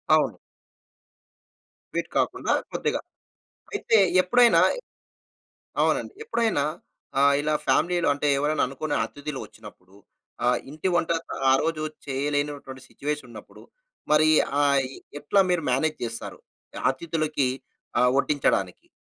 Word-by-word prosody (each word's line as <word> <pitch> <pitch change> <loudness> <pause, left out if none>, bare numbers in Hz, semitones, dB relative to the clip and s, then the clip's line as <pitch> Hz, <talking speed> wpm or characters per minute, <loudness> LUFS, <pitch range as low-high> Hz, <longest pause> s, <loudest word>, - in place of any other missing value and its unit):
అవును. - - +1 1.6
స్వీట్ - - -2
కాకుండా - - 0 0.2
కొద్దిగా. - - -1 0.7
అయితే 230 - +2 0.2
ఎప్పుడైనా 240 +6 +5 1.2
అవునండి. - - +1
ఎప్పుడైనా 225 - +1 0.6
ఆహ్, 140 0 +5
ఇలా 155 +1 0
ఫ్యామిలీ‌లో 175 +6 +2
అంటే 145 +1 -2
ఎవరైనా 145 +2 +1
అనుకోని 145 +3 -3
అతిథులు 145 -1 -7
ఒచ్చినప్పుడు 95 +1 -15 0.5
ఆహ్, 125 0 +3
ఇంటి 155 +5 -2
వంట 170 -1 +1 0.4
ఆరోజు 155 +3 +1 0.2
చేయలేనటువంటి 145 -1 -2
సిట్యుయేషన్ 145 -3 -4
ఉన్నప్పుడు 110 -2 -12 0.5
మరి 155 +1 +5 0.3
ఆహ్, 140 -1 +4
ఈ - - -11 0.2
ఎట్లా 195 +7 +3
మీరు 175 -3 +1
మేనేజ్ 155 +5 +1
చేస్తారు? 115 -1 -6 0.4
ఆహ్, - - -5
అతిథులకి 155 -1 -1 0.5
ఆహ్, 125 0 +4
వడ్డించడానికి? 135 -10 0
145 Hz, 105 wpm, -25 LUFS, 135-155 Hz, 1.6 s, ఎప్పుడైనా